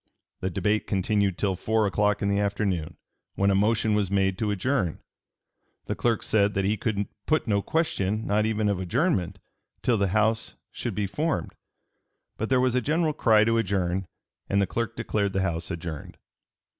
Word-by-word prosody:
The 95 Hz, -, -2 dB
debate 105 Hz, +4 st, 0 dB
continued 100 Hz, -1 st, +1 dB
till 95 Hz, -2 st, 0 dB
four 110 Hz, +3 st, +1 dB
o'clock 105 Hz, +1 st, +1 dB
in -, -, +1 dB
the 100 Hz, 0 st, +1 dB
afternoon, 95 Hz, -6 st, -1 dB, 0.4 s
when 100 Hz, 0 st, +2 dB
a -, -, +3 dB
motion 110 Hz, +2 st, +2 dB
was 105 Hz, -3 st, +1 dB
made 95 Hz, -1 st, +2 dB
to 110 Hz, -, 0 dB
adjourn. 105 Hz, -, 0 dB, 0.9 s
The -, -, -2 dB
clerk 115 Hz, -2 st, 0 dB
said 105 Hz, -1 st, +2 dB
that 95 Hz, 0 st, +1 dB
he 105 Hz, +2 st, +2 dB
could 105 Hz, -2 st, -1 dB, 0.2 s
put 155 Hz, 0 st, +2 dB
no 100 Hz, -2 st, +2 dB
question, 110 Hz, -, -1 dB
not 105 Hz, +1 st, +2 dB
even 110 Hz, -1 st, 0 dB
of 100 Hz, -3 st, 0 dB
adjournment, 95 Hz, -, 0 dB, 0.5 s
till 115 Hz, -4 st, +2 dB
the 100 Hz, -, +2 dB
House 110 Hz, +3 st, +1 dB, 0.2 s
should -, -, -4 dB
be 105 Hz, -, 0 dB
formed. 155 Hz, -, -2 dB, 0.8 s
But 110 Hz, -, -3 dB
there 130 Hz, -1 st, +4 dB
was 130 Hz, -1 st, +2 dB
a 125 Hz, -, +2 dB
general 155 Hz, +4 st, +1 dB
cry 110 Hz, -7 st, +4 dB
to 115 Hz, +1 st, +2 dB
adjourn, 95 Hz, -3 st, -1 dB, 0.4 s
and 100 Hz, -, +2 dB
the 100 Hz, -, +3 dB
clerk 115 Hz, +4 st, -3 dB
declared 100 Hz, -2 st, -1 dB
the 95 Hz, -, +1 dB
House 85 Hz, -2 st, -2 dB
adjourned. 85 Hz, -4 st, -6 dB
105 Hz, 180 wpm, -26 LUFS, 95-110 Hz, 0.9 s, there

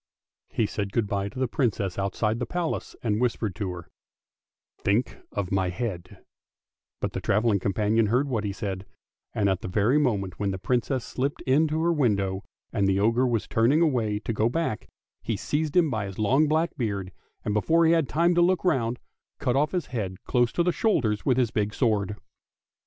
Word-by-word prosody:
He 115 Hz, -, 0 dB
said 100 Hz, -1 st, -3 dB
good 115 Hz, -, +2 dB
bye 100 Hz, -1 st, -2 dB
to 100 Hz, -, -13 dB
the 130 Hz, 0 st, +1 dB
Princess 105 Hz, -7 st, -1 dB
outside 105 Hz, +3 st, 0 dB
the 125 Hz, -, -2 dB
Palace, 175 Hz, -2 st, -3 dB
and 110 Hz, -1 st, 0 dB
whispered 115 Hz, -4 st, 0 dB
to 100 Hz, -, -2 dB
her, 90 Hz, -1 st, -7 dB, 0.5 s
" -, -, -54 dB
Think 105 Hz, +5 st, +1 dB
of 100 Hz, -3 st, -3 dB
my 95 Hz, -1 st, +1 dB
head," 90 Hz, -2 st, -5 dB, 0.8 s
but -, -, -2 dB
the -, -, -3 dB
travelling 105 Hz, 0 st, +2 dB
companion 105 Hz, +3 st, +1 dB
heard 125 Hz, +7 st, +2 dB
what 115 Hz, -6 st, -1 dB
he 100 Hz, -, -1 dB
said, 95 Hz, -2 st, -5 dB, 0.5 s
and 105 Hz, -2 st, +2 dB
at 95 Hz, -2 st, 0 dB
the -, -, -5 dB
very 105 Hz, +9 st, +2 dB
moment 100 Hz, -10 st, -1 dB
when 100 Hz, -1 st, 0 dB
the 95 Hz, -, -2 dB
Princess 125 Hz, +4 st, -1 dB
slipped 135 Hz, +3 st, -2 dB
in 140 Hz, +5 st, +3 dB
at -, -, -2 dB
her 160 Hz, +3 st, +1 dB
window, 100 Hz, -, +1 dB, 0.3 s
and 100 Hz, -3 st, +2 dB
the 95 Hz, 0 st, +2 dB
ogre 115 Hz, +5 st, +3 dB
was 115 Hz, -3 st, -1 dB
turning 130 Hz, +9 st, +3 dB
away 115 Hz, -9 st, +1 dB
to 115 Hz, +2 st, -3 dB
go 110 Hz, +2 st, +2 dB
back, 145 Hz, -5 st, -2 dB, 0.3 s
he 110 Hz, -3 st, -2 dB
seized 150 Hz, -, -1 dB
him 165 Hz, -5 st, +4 dB
by 110 Hz, -4 st, -2 dB
his 95 Hz, -, -8 dB
long 130 Hz, +9 st, +3 dB
black 160 Hz, +3 st, +1 dB
beard, 100 Hz, -7 st, -2 dB, 0.3 s
and 105 Hz, -, 0 dB
before 165 Hz, +11 st, +3 dB
he 160 Hz, -, +5 dB
had 165 Hz, -5 st, +2 dB
time 170 Hz, +3 st, +3 dB
to 175 Hz, -, +3 dB
look 185 Hz, +1 st, +2 dB
round, 125 Hz, -8 st, +1 dB, 0.4 s
cut 125 Hz, -, 0 dB
off 150 Hz, +3 st, +2 dB
his 180 Hz, -5 st, -1 dB
head 95 Hz, -6 st, -4 dB
close 120 Hz, -1 st, +2 dB
to 170 Hz, -, +1 dB
the 180 Hz, -, +2 dB
shoulders 125 Hz, -, 0 dB
with 130 Hz, -2 st, +3 dB
his 120 Hz, -4 st, +2 dB
big 105 Hz, 0 st, -1 dB
sword. 105 Hz, -5 st, +1 dB
115 Hz, 200 wpm, -26 LUFS, 100-135 Hz, 0.8 s, he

